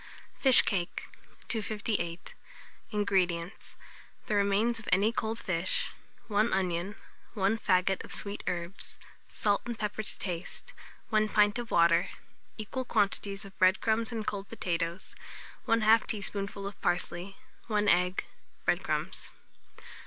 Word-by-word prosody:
FISH 265 -2 +8
CAKE. 180 -4 -2 0.4
258. 210 -5 -2 0.6
INGREDIENTS. 190 -3 -1 0.5
The - - -2
remains 205 +3 +2
of 220 - -7
any 200 +4 +4
cold 225 -1 -2
fish, 185 -4 0 0.4
1 215 +1 +2
onion, 185 +1 -1 0.4
1 205 +2 +1
faggot 185 -1 +2
of - - -11
sweet 200 0 -1
herbs; 180 +1 -4 0.3
salt 205 -2 +1
and 235 -2 -4
pepper 210 0 -2
to 215 - -4
taste, 180 -2 -5 0.4
1 215 -1 +2
pint 210 +2 +3
of 235 -1 -5
water, 170 0 +4 0.5
equal 225 +4 -3
quantities 200 -3 0
of 195 - -12
bread 185 +1 +5
crumbs 225 +1 0
and 225 -2 -3
cold 200 -1 -3
potatoes, 170 +1 -3 0.5
1/2 225 0 +4
teaspoonful 200 -1 -3
of 200 - -7
parsley, 180 +2 -1 0.3
1 210 -2 +1
egg, 180 0 +3 0.4
bread - - +2
crumbs. - - -2
200 Hz, 125 wpm, -30 LUFS, 185-215 Hz, 0.6 s, FISH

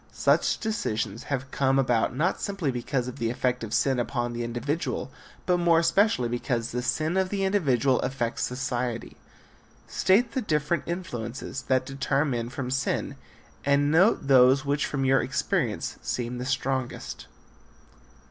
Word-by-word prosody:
Such - - +2
decisions 110 - -2
have 135 -1 -3
come 135 -1 +2
about 125 -3 +2
not 170 +7 0
simply 195 -9 -1
because 125 +1 -2
of 125 - -6
the 115 -1 0
effect 125 0 -1
of 110 - -6
sin 130 +1 +2
upon 120 0 -2
the 120 0 -3
individual 125 +2 -3 0.3
but 180 -1 +3
more 170 -1 +4
especially 165 - +3
because 120 -1 -2
the 125 - -2
sin 155 +7 0
of 190 -1 +1
the 195 0 -1
individual 140 - +2
affects 120 -3 -2
society. 125 -2 -3 0.7
State 225 +5 +2
the 260 - -1
different 155 - 0
influences 135 -7 -5
that 130 -1 +2
deter 135 +1 0
men 120 -4 -2
from 125 0 -4
sin 130 - -1 0.5
and 140 +1 +3
note 180 +1 +4
those 135 0 +5
which 140 +1 0
from 135 -2 -1
your 135 0 +4
experience 140 - -1
seem 120 0 -3
the 125 - -4
strongest. 130 -1 -3
135 Hz, 150 wpm, -26 LUFS, 120-155 Hz, 0.7 s, those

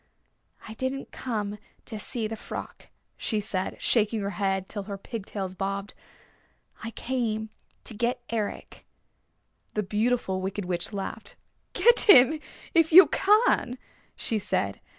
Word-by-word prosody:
"I 220 - -7
didn't 260 +3 -4
come 210 -4 -4 0.3
to 215 - -6
see 230 +1 -2
the 220 +1 -3
frock," - - -8 0.3
she 215 - -1
said, 195 -2 -3
shaking 220 -1 +2
her 200 0 -2
head 195 -2 -1
till 205 - -4
her 200 - -4
pigtails 195 -3 -5
bobbed. 195 +1 -3 0.9
"I 230 - -3
came 225 -3 -2 0.3
to - - -8
get 235 +4 -1
Eric." 220 -3 -4 0.9
The 210 - +1
Beautiful 210 -1 0
Wicked 195 +1 -3
Witch 175 +1 -2
laughed. 205 +1 -6 0.4
"Get 475 -1 +5
him 270 -1 +8 0.3
if 330 -2 +4
you 370 +4 +10
can," 415 - +3 0.4
she 220 - -1
said. 200 - -2
215 Hz, 130 wpm, -27 LUFS, 200-245 Hz, 0.9 s, you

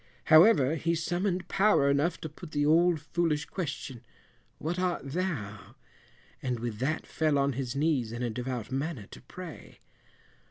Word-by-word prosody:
However, 155 - +6
he 165 +2 0
summoned 180 +3 -1
power 195 -8 +3
enough 145 +5 +1
to - - -4
put 155 +1 -12
the 145 0 +1
old 165 +2 +4
foolish 160 0 -1
question, 140 -8 -5 0.5
"what 170 +4 -3
art 180 -1 -1
thou?" 135 - -4 0.7
and 125 -3 -2
with 115 -2 -4
that 150 +5 -1
fell 155 -2 +1
on 140 0 +2
his 130 0 -4
knees 140 -6 +1
in 120 +1 -4
a 120 - -1
devout 125 0 -4
manner 135 -4 -3
to - - -11
pray. 170 +6 -10
150 Hz, 155 wpm, -29 LUFS, 130-170 Hz, 0.7 s, However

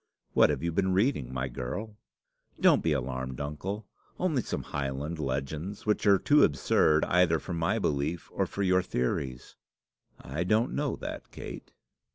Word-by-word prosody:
What - - +6
have - - -1
you 85 - 0
been 95 +2 +1
reading, 95 - +1
my 65 +1 -2
girl?" 65 - -5 0.6
"Don't - - +5
be 80 - +1
alarmed, 65 -2 -2
uncle. 90 +9 -4 0.3
Only 160 -8 +1
some - - -4
Highland 70 +3 -3
legends, 75 +8 -3
which 105 0 +1
are 100 -1 +7
too 145 +10 +4
absurd 75 +2 +3
either 90 -2 +3
for 90 - -6
my 85 +6 +1
belief 75 -3 -1
or - - 0
for 100 - -3
your 95 -1 +4
theories." 65 -5 -3 0.6
"I 75 +6 -3
don't 110 +7 +2
know 145 -1 -1
that, - - -7
Kate." - - -9
80 Hz, 160 wpm, -29 LUFS, 70-100 Hz, 0.6 s, are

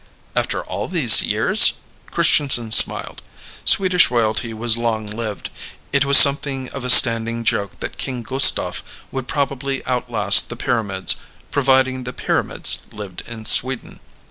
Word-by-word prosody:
"After - - -4
all - - -8
these - - +4
years?" - - +3 0.3
Christianson 120 -6 0
smiled. - - +2 0.4
Swedish 185 -2 +2
royalty 115 -1 -3
was 115 0 -1
long 115 -2 -5
lived. 105 -1 -9 0.4
It 140 0 0
was 140 0 +6
something 140 -2 +3
of 135 - -10
a 125 - -6
standing 115 -1 +5
joke 100 -3 -4
that - - -9
King 125 -3 -7
Gustaf 135 +4 +1 0.3
would 130 -1 -8
probably 140 -1 -5
outlast 120 -5 +1
the 120 - -8
pyramids, 100 -6 -2 0.3
providing 130 -1 -1
the 125 0 -9
pyramids - - -2
lived 105 -3 -11
in 110 -2 -12
Sweden. 130 +2 0
120 Hz, 135 wpm, -16 LUFS, 110-135 Hz, 0.4 s, was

